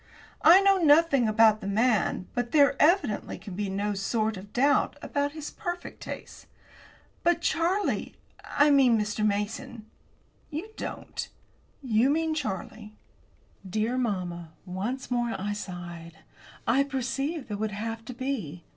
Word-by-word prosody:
I 355 Hz, +4 st, +8 dB
know 395 Hz, -1 st, +4 dB
nothing 295 Hz, -6 st, +5 dB
about 215 Hz, 0 st, +4 dB
the -, -, -5 dB
man, 215 Hz, -3 st, +1 dB
but 245 Hz, -1 st, -2 dB
there, 285 Hz, -2 st, +5 dB
evidently, 300 Hz, -, +2 dB
can 200 Hz, -, -9 dB
be 200 Hz, +1 st, -3 dB
no 200 Hz, +2 st, -1 dB
sort 215 Hz, +2 st, -1 dB
of 200 Hz, +2 st, -10 dB
doubt 280 Hz, +3 st, +2 dB
about 285 Hz, 0 st, -2 dB
his 310 Hz, -2 st, -6 dB
perfect 350 Hz, -2 st, -6 dB
taste." -, -, -8 dB, 0.7 s
"But, 340 Hz, 0 st, +2 dB
Charlie 345 Hz, +6 st, 0 dB, 0.3 s
I 290 Hz, +1 st, +3 dB
mean, 255 Hz, -5 st, +5 dB
Mr. 210 Hz, 0 st, -2 dB
Mason." 215 Hz, +3 st, -2 dB, 0.6 s
"You 325 Hz, +7 st, -5 dB
don't -, -, -6 dB, 0.5 s
you 235 Hz, +1 st, +3 dB
mean 320 Hz, +2 st, +1 dB
Charlie." 215 Hz, -, -5 dB, 0.7 s
Dear 220 Hz, +5 st, 0 dB
mamma, 180 Hz, -9 st, -3 dB
once 210 Hz, +9 st, -4 dB
more 240 Hz, -1 st, 0 dB
I 205 Hz, +2 st, -2 dB
sighed. 175 Hz, -4 st, -7 dB, 0.5 s
I 265 Hz, +4 st, +3 dB
perceived 275 Hz, +2 st, -2 dB
that -, -, -4 dB
it 205 Hz, -, -4 dB
would 220 Hz, 0 st, -1 dB
have 225 Hz, +2 st, -5 dB
to 250 Hz, -, -7 dB
be. 225 Hz, -, -4 dB
235 Hz, 140 wpm, -27 LUFS, 205-285 Hz, 0.7 s, I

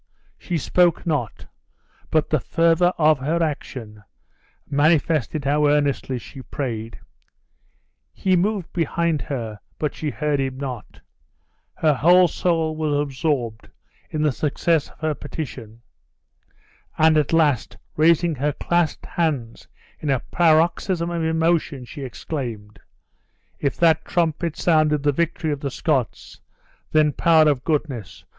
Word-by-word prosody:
She 175 Hz, -, -2 dB
spoke 175 Hz, +4 st, +2 dB
not, 145 Hz, -10 st, -2 dB, 0.6 s
but 155 Hz, -1 st, +1 dB
the 155 Hz, -, +3 dB
fervor 165 Hz, +5 st, +2 dB
of 155 Hz, -2 st, +4 dB
her 160 Hz, +5 st, 0 dB
action 120 Hz, -8 st, -5 dB, 0.7 s
manifested 150 Hz, -1 st, +1 dB
how 150 Hz, +1 st, +2 dB
earnestly 145 Hz, -3 st, +1 dB
she 130 Hz, +3 st, -10 dB
prayed. 115 Hz, -5 st, -5 dB, 1.1 s
He 185 Hz, -1 st, +1 dB
moved 190 Hz, 0 st, -1 dB
behind 170 Hz, -2 st, 0 dB
her, 115 Hz, -5 st, -5 dB, 0.2 s
but 150 Hz, -2 st, -2 dB
she 155 Hz, -, -3 dB
heard 150 Hz, 0 st, -1 dB
him 135 Hz, -1 st, -2 dB
not; 130 Hz, -5 st, -7 dB, 0.7 s
her 155 Hz, -2 st, +2 dB
whole 175 Hz, +6 st, +5 dB
soul 165 Hz, -1 st, 0 dB
was 155 Hz, -2 st, 0 dB
absorbed 135 Hz, -6 st, -2 dB, 0.4 s
in 155 Hz, -1 st, -2 dB
the 150 Hz, -, +3 dB
success 155 Hz, +3 st, 0 dB
of -, -, -22 dB
her 155 Hz, -1 st, 0 dB
petition; 125 Hz, -7 st, -8 dB, 1.1 s
and 160 Hz, 0 st, +5 dB
at 150 Hz, -2 st, +2 dB
last 150 Hz, -7 st, +1 dB, 0.2 s
raising 165 Hz, +2 st, +3 dB
her 145 Hz, +1 st, -1 dB
clasped 170 Hz, 0 st, -1 dB
hands 140 Hz, -9 st, -2 dB, 0.3 s
in 150 Hz, -, -4 dB
a 135 Hz, -3 st, +1 dB
paroxysm 170 Hz, +1 st, +2 dB
of 170 Hz, -1 st, -2 dB
emotion, 160 Hz, -4 st, 0 dB
she 145 Hz, +4 st, -9 dB
exclaimed, 115 Hz, -5 st, -6 dB, 0.8 s
"If 140 Hz, -, -1 dB
that 160 Hz, -1 st, +3 dB
trumpet 165 Hz, -1 st, -1 dB
sounded 155 Hz, -3 st, +2 dB
the 145 Hz, -, +3 dB
victory 165 Hz, +1 st, -1 dB
of 145 Hz, -, -2 dB
the 140 Hz, -, -3 dB
Scots, 135 Hz, -2 st, -2 dB, 0.5 s
then, 155 Hz, -1 st, +3 dB
Power 160 Hz, +1 st, +4 dB
of 140 Hz, -4 st, +1 dB
Goodness! 145 Hz, -, -3 dB
150 Hz, 130 wpm, -22 LUFS, 135-165 Hz, 1.1 s, whole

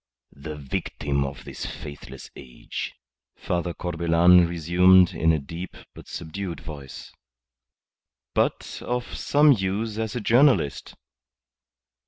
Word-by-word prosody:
"The 75 Hz, +2 st, -7 dB
victim 70 Hz, 0 st, -2 dB
of 70 Hz, -1 st, -7 dB
this -, -, -7 dB
faithless 70 Hz, -2 st, -9 dB
age," 60 Hz, -2 st, -7 dB, 0.4 s
Father 85 Hz, 0 st, -2 dB
Corbelan 85 Hz, +1 st, +4 dB
resumed 90 Hz, +2 st, +4 dB
in 80 Hz, -, +2 dB
a 80 Hz, -, +2 dB
deep 85 Hz, +5 st, -8 dB, 0.2 s
but -, -, -13 dB
subdued 85 Hz, +2 st, -6 dB
voice. 70 Hz, -4 st, -10 dB, 1.2 s
"But -, -, -1 dB
of 125 Hz, 0 st, -3 dB
some 145 Hz, +1 st, +4 dB
use 105 Hz, 0 st, -1 dB
as 110 Hz, 0 st, -3 dB
a -, -, -1 dB
journalist." 120 Hz, -, +2 dB
85 Hz, 110 wpm, -25 LUFS, 75-100 Hz, 1.2 s, Corbelan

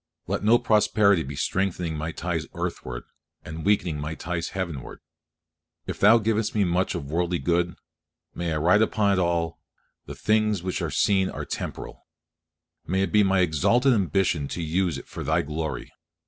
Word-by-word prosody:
Let -, -, -2 dB
no 115 Hz, +3 st, +6 dB
prosperity 105 Hz, -4 st, +3 dB
be 70 Hz, -1 st, -6 dB
strengthening 90 Hz, +1 st, -1 dB
my 80 Hz, +2 st, -3 dB
ties 85 Hz, -2 st, -3 dB
earthward, -, -, -4 dB, 0.4 s
and 80 Hz, 0 st, -7 dB
weakening 90 Hz, -6 st, +1 dB
my 75 Hz, +2 st, -4 dB
ties 85 Hz, 0 st, -3 dB
heavenward. 85 Hz, -8 st, -5 dB, 0.9 s
If -, -, -5 dB
Thou 110 Hz, +4 st, +7 dB
givest 110 Hz, 0 st, 0 dB
me 105 Hz, -, +3 dB
much 90 Hz, +1 st, 0 dB
of 70 Hz, +1 st, -5 dB
worldly 85 Hz, +1 st, 0 dB
good, 85 Hz, 0 st, 0 dB, 0.6 s
may 85 Hz, -1 st, -3 dB
I 80 Hz, -, 0 dB
write 90 Hz, +7 st, +4 dB
upon 105 Hz, -2 st, +2 dB
it 95 Hz, -, +1 dB
all, 85 Hz, -2 st, 0 dB, 0.5 s
"the -, -, -7 dB
things 105 Hz, -3 st, +1 dB
which 95 Hz, -1 st, -2 dB
are -, -, -1 dB
seen 95 Hz, -2 st, +2 dB
are -, -, -5 dB
temporal." -, -, -6 dB, 0.8 s
May 95 Hz, +3 st, +1 dB
it -, -, -2 dB
be 105 Hz, -, +5 dB
my 95 Hz, -2 st, +3 dB
exalted 115 Hz, -, +3 dB
ambition 90 Hz, -6 st, +1 dB
to 85 Hz, -, -4 dB
use 85 Hz, -1 st, 0 dB
it -, -, -10 dB
for -, -, -7 dB
Thy -, -, +1 dB
glory. 75 Hz, +2 st, -4 dB
90 Hz, 170 wpm, -25 LUFS, 80-100 Hz, 0.9 s, Thou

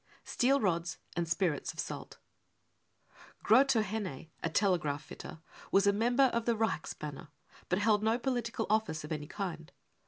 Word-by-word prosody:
Steel 270 Hz, +3 st, +2 dB
Rods 170 Hz, -4 st, 0 dB, 0.2 s
and 170 Hz, -1 st, -1 dB
Spirits 170 Hz, -4 st, 0 dB
of -, -, -13 dB
Salt. -, -, -5 dB, 1.3 s
Grotohenne, 215 Hz, -, +2 dB
a 165 Hz, -, -1 dB
tele 185 Hz, +1 st, +3 dB
graph 145 Hz, -1 st, -3 dB
fitter, 160 Hz, -, -10 dB, 0.3 s
was 195 Hz, +1 st, +5 dB
a 200 Hz, -, +5 dB
member 245 Hz, +5 st, +3 dB
of 230 Hz, -1 st, 0 dB
the 235 Hz, -, +2 dB
Reichsbanner, 155 Hz, -7 st, -3 dB, 0.4 s
but 180 Hz, -, +2 dB
held 210 Hz, 0 st, +3 dB
f -, -, -2 dB
MURDER 220 Hz, +1 st, +3 dB
no -, -, -3 dB
political 240 Hz, -3 st, -1 dB
office 210 Hz, -8 st, 0 dB
of 150 Hz, -, -8 dB
any 150 Hz, -1 st, -3 dB
kind. 165 Hz, -5 st, -5 dB
200 Hz, 160 wpm, -32 LUFS, 165-225 Hz, 1.3 s, was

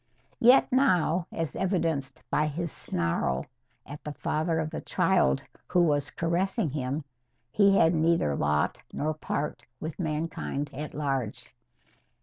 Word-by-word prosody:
Yet 250 Hz, +4 st, +6 dB
now, 180 Hz, -, +3 dB
as 165 Hz, -2 st, -3 dB
evidenced 165 Hz, -8 st, -1 dB
by 150 Hz, 0 st, +2 dB
his 165 Hz, +2 st, -3 dB
snarl 75 Hz, -6 st, 0 dB, 0.4 s
at 145 Hz, +1 st, -9 dB
the 150 Hz, -, -5 dB
father 160 Hz, +4 st, -1 dB
of 155 Hz, -1 st, -1 dB
the -, -, -4 dB
child 65 Hz, 0 st, +2 dB, 0.2 s
who 180 Hz, -, +3 dB
was 145 Hz, -3 st, +1 dB
caressing 170 Hz, -, 0 dB
him, 140 Hz, +1 st, -2 dB, 0.5 s
he 200 Hz, +2 st, +5 dB
had 165 Hz, -, +5 dB
neither 160 Hz, -, +2 dB
lot 75 Hz, +1 st, 0 dB
nor 155 Hz, +1 st, -1 dB
part 150 Hz, -1 st, -3 dB, 0.2 s
with 160 Hz, +2 st, -6 dB
mankind 155 Hz, -3 st, -2 dB
at 150 Hz, +3 st, -6 dB
large. 135 Hz, -6 st, -3 dB
155 Hz, 130 wpm, -28 LUFS, 140-170 Hz, 0.5 s, Yet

